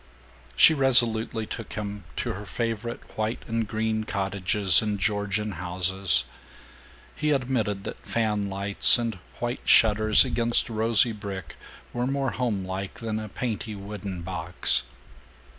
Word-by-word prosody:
She 160 Hz, -, +7 dB
resolutely 120 Hz, -5 st, +2 dB
took 115 Hz, -, -8 dB
him 105 Hz, -3 st, -6 dB
to 120 Hz, -, -3 dB
her 100 Hz, +1 st, -8 dB
favorite 115 Hz, +2 st, -4 dB
white 110 Hz, +2 st, -3 dB
and 115 Hz, -2 st, -2 dB
green 110 Hz, 0 st, -2 dB
cottages 95 Hz, -2 st, +2 dB
and 105 Hz, -2 st, -2 dB
Georgian 105 Hz, +1 st, -1 dB
houses. 90 Hz, -5 st, +2 dB, 0.9 s
He 150 Hz, -, -2 dB
admitted 125 Hz, -8 st, -1 dB
that -, -, -8 dB
fanlights, 100 Hz, -3 st, +3 dB
and 115 Hz, -5 st, -4 dB, 0.2 s
white 120 Hz, +1 st, -4 dB
shutters 110 Hz, -1 st, +5 dB
against 120 Hz, +1 st, +1 dB
rosy 115 Hz, +1 st, +4 dB
brick, 100 Hz, -4 st, -8 dB, 0.4 s
were 120 Hz, +1 st, -2 dB
more 135 Hz, -1 st, -1 dB
homelike 100 Hz, -5 st, -4 dB
than 110 Hz, -2 st, -4 dB
a 110 Hz, -1 st, -7 dB
painty 110 Hz, -1 st, -5 dB
wooden 100 Hz, -3 st, -7 dB
box. 85 Hz, -1 st, -1 dB
105 Hz, 125 wpm, -25 LUFS, 100-115 Hz, 0.9 s, She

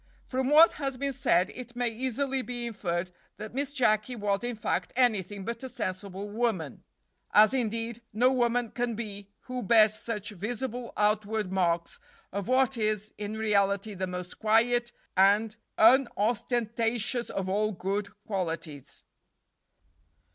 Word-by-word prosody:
From 260 Hz, 0 st, -1 dB
what 315 Hz, +3 st, +8 dB
has 270 Hz, -2 st, -2 dB
been 275 Hz, +1 st, -1 dB
said 180 Hz, -5 st, +2 dB
it 245 Hz, -1 st, -9 dB
may 245 Hz, -1 st, 0 dB
easily 260 Hz, +3 st, -2 dB
be 245 Hz, 0 st, -5 dB
inferred 180 Hz, -6 st, -3 dB, 0.3 s
that 215 Hz, +1 st, -8 dB
Miss 280 Hz, +1 st, -2 dB
Jacky 245 Hz, -3 st, +1 dB
was, 205 Hz, -1 st, -1 dB
in 240 Hz, 0 st, -2 dB
fact, 215 Hz, -, -2 dB
anything 205 Hz, -6 st, +1 dB
but 230 Hz, 0 st, -4 dB
a 260 Hz, -, -5 dB
sensible 200 Hz, -4 st, -5 dB
woman, 205 Hz, -, -2 dB, 0.5 s
as, 215 Hz, +2 st, +7 dB
indeed, 230 Hz, -2 st, -2 dB
no 245 Hz, +4 st, +3 dB
woman 240 Hz, -2 st, +1 dB
can 240 Hz, -2 st, -2 dB
be 205 Hz, -3 st, -6 dB
who 255 Hz, 0 st, -5 dB
bears 215 Hz, 0 st, +5 dB
such 215 Hz, -1 st, -3 dB
visible 240 Hz, +4 st, -4 dB
outward 210 Hz, -1 st, +1 dB
marks 170 Hz, -3 st, 0 dB, 0.3 s
of 200 Hz, -1 st, -3 dB
what 260 Hz, 0 st, +2 dB
is 215 Hz, -1 st, -1 dB
in 210 Hz, +1 st, -4 dB
reality 200 Hz, -1 st, +1 dB
the 185 Hz, -1 st, -3 dB
most 180 Hz, 0 st, -6 dB
quiet 235 Hz, +2 st, +3 dB, 0.2 s
and 205 Hz, +3 st, +4 dB, 0.2 s
unostentatious 235 Hz, 0 st, +2 dB
of 190 Hz, -1 st, -3 dB
all 210 Hz, +3 st, +1 dB
good 200 Hz, +2 st, -2 dB, 0.2 s
qualities." 165 Hz, -, -4 dB
220 Hz, 140 wpm, -28 LUFS, 200-245 Hz, 0.5 s, what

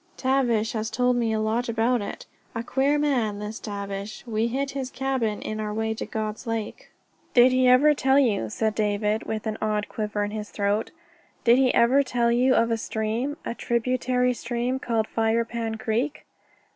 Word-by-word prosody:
Tavish 245 Hz, -5 st, +1 dB
has 220 Hz, -1 st, -2 dB
told 250 Hz, +2 st, +1 dB
me 235 Hz, -2 st, +1 dB
a 220 Hz, -, 0 dB
lot 225 Hz, +3 st, 0 dB
about 230 Hz, +1 st, +1 dB
it. 200 Hz, -, -6 dB, 0.3 s
A 230 Hz, -, -2 dB
queer 275 Hz, +4 st, +1 dB
man 250 Hz, -8 st, +1 dB
this 210 Hz, +2 st, -6 dB
Tavish. 200 Hz, 0 st, -6 dB
We 225 Hz, -1 st, 0 dB
hit 270 Hz, +3 st, -2 dB
his 270 Hz, -2 st, -4 dB
cabin 260 Hz, -5 st, -2 dB
on 215 Hz, 0 st, -3 dB
our 210 Hz, -1 st, -3 dB
way 220 Hz, +1 st, -1 dB
to 220 Hz, -, -6 dB
God's 215 Hz, +2 st, -4 dB
Lake." 225 Hz, -2 st, -4 dB, 0.5 s
"Did 250 Hz, +1 st, +7 dB
he 255 Hz, 0 st, +3 dB
ever 265 Hz, +4 st, +6 dB
tell 270 Hz, -1 st, +2 dB
you," 215 Hz, -, +2 dB
said 220 Hz, -, -1 dB
David, 210 Hz, 0 st, 0 dB
with 220 Hz, 0 st, -3 dB
an 220 Hz, 0 st, -3 dB
odd 210 Hz, -1 st, -1 dB
quiver 210 Hz, -1 st, -2 dB
in 205 Hz, -, -3 dB
his 210 Hz, -1 st, -5 dB
throat 205 Hz, +1 st, -1 dB, 0.5 s
"Did 240 Hz, +2 st, +5 dB
he 260 Hz, -2 st, +4 dB
ever 255 Hz, +4 st, +5 dB
tell 240 Hz, -3 st, +1 dB
you 255 Hz, +2 st, +3 dB
of 230 Hz, 0 st, +2 dB
a 230 Hz, -, +1 dB
stream, 225 Hz, +6 st, -2 dB
a -, -, -2 dB
tributary 250 Hz, +1 st, 0 dB
stream, 245 Hz, +2 st, -2 dB
called 225 Hz, -4 st, 0 dB
Firepan 225 Hz, 0 st, -1 dB
Creek?" 235 Hz, +7 st, -2 dB
230 Hz, 185 wpm, -25 LUFS, 215-250 Hz, 0.5 s, Did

